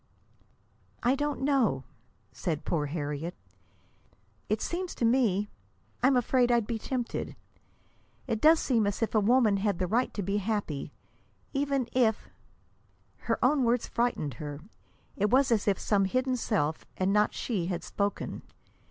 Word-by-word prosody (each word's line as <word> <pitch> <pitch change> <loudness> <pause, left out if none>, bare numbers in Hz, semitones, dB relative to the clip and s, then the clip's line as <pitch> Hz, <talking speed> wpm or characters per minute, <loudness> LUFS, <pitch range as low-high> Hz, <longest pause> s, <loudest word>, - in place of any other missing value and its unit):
"I 245 +2 +4
don't 290 0 -2
know," 260 - +2 0.5
said 160 -4 -3
poor 150 -3 0
Harriet. 150 +2 -4 1.1
"It - - +1
seems 360 +1 -3
to 235 - 0
me 220 -5 +2 0.5
I'm 260 0 +4
afraid 245 0 +2
I'd 235 -2 +3
be 225 +1 -3
tempted. 245 0 -3 0.9
It 220 - -2
does 315 +1 +6
seem 230 -6 +2
as 205 +3 -1
if 225 - -1
a 220 - +4
woman 220 -1 +4
had 200 -2 0
the 185 - 0
right 235 +8 +1
to 205 - -2
be 200 +3 0
happy, 205 -8 -2 0.6
even 275 -3 0
if 230 -4 +1 0.5
" - - -38
Her - - +2
own 285 -3 +3
words 235 0 +2
frightened 235 - -1
her. 145 -1 -6 0.5
It 205 +1 +1
was 260 +2 +4
as 215 -3 +2
if 200 -2 +3
some 200 -2 +1
hidden 255 +6 0
self, 180 -10 -1
and 190 +1 +1
not 210 0 +2
she, 195 -8 -2
had 180 -2 -3
spoken. 200 0 -3
220 Hz, 150 wpm, -29 LUFS, 195-255 Hz, 1.1 s, does